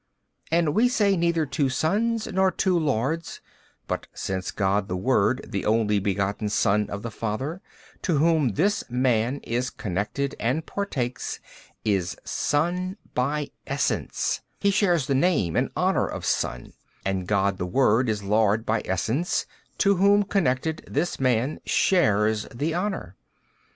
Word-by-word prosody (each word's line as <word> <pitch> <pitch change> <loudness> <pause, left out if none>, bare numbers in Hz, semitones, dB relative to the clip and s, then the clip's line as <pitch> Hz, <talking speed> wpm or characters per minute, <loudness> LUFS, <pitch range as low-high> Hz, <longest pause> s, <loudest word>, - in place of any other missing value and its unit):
And 165 -2 +2
we 240 +6 +4
say 205 -5 +3
neither 170 -2 +1
two 140 0 0
sons 215 - 0
nor 190 0 +2
two 185 0 +1
lords: 150 +3 -1 0.5
but - - -3
since 95 -1 -3
God 100 0 0
the 90 - -2
Word 125 +3 +1
the 100 -3 -3
Only 105 -1 +2
Begotten 100 +2 -1
Son 105 0 +2
of 100 +1 -5
the 115 - -4
Father, 130 - -3 0.4
to 170 -6 +1
Whom 155 -6 +3
this 205 +4 +1
man 125 +1 +1
is 125 +2 -1
connected 105 +8 -3
and 135 +8 0
partakes, 130 -12 -3 0.5
is 95 -5 0
Son 180 +6 -1 0.2
by 145 +4 -1 0.2
Essence, - - -1 0.2
he 200 - +3
shares 180 -7 +2
the 140 - 0
name 135 - +2
and - - +1
honour - - +2
of - - -5
Son: - - -2 0.3
and 95 -2 -1
God 100 -1 +1
the 90 - -2
Word 120 +3 +3
is 105 -2 -1
Lord 105 +2 +2
by 110 0 +1
Essence, 115 - 0 0.3
to 200 -1 +3
Whom 200 +2 +5
connected, 160 -5 0
this 160 +5 -1
man 130 +2 +1
shares 110 - +2
the 150 +7 -2
honour. 180 - -3
130 Hz, 145 wpm, -25 LUFS, 105-170 Hz, 0.5 s, Whom